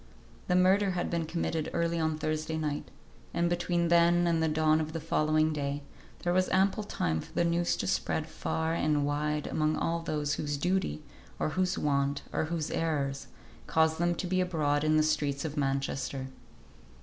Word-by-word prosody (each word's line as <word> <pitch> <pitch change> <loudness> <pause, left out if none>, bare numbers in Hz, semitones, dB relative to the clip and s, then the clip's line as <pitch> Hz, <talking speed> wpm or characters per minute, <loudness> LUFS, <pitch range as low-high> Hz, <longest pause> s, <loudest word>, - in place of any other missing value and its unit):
The 180 - +2
murder 190 +2 +4
had 175 - -2
been 170 -1 0
committed 160 -1 -2
early 170 0 0
on 160 -1 0
Thursday 155 +1 -2
night, 150 -2 -3 0.5
and 170 - +2
between 175 0 0
then 170 +1 +5
and 165 -1 +2
the 160 - +2
dawn 155 0 +3
of 155 0 -4
the 165 - -2
following 155 0 +2
day 145 -1 -3 0.4
there 175 - +1
was 185 0 +2
ample 190 +2 +2
time 80 - -1
for - - -13
the - - +2
news 170 +1 +1
to - - -2
spread - - 0
far 160 0 -2
and 150 -3 +1
wide 150 +1 -1
among 155 0 0
all 170 0 0
those 150 -3 -1
whose 145 -1 -2
duty, 180 -1 -1 0.3
or - - 0
whose 185 +3 0
want, 140 0 0
or - - 0
whose 160 -1 -3
errors, 140 -4 -1 0.4
caused 160 0 +2
them 175 0 +2
to 180 - -3
be 185 +1 +1
abroad 150 -5 +1
in 155 0 +3
the 155 - +4
streets 150 -2 0
of 150 -2 -4
Manchester. 135 -1 -2
160 Hz, 185 wpm, -30 LUFS, 150-170 Hz, 0.5 s, then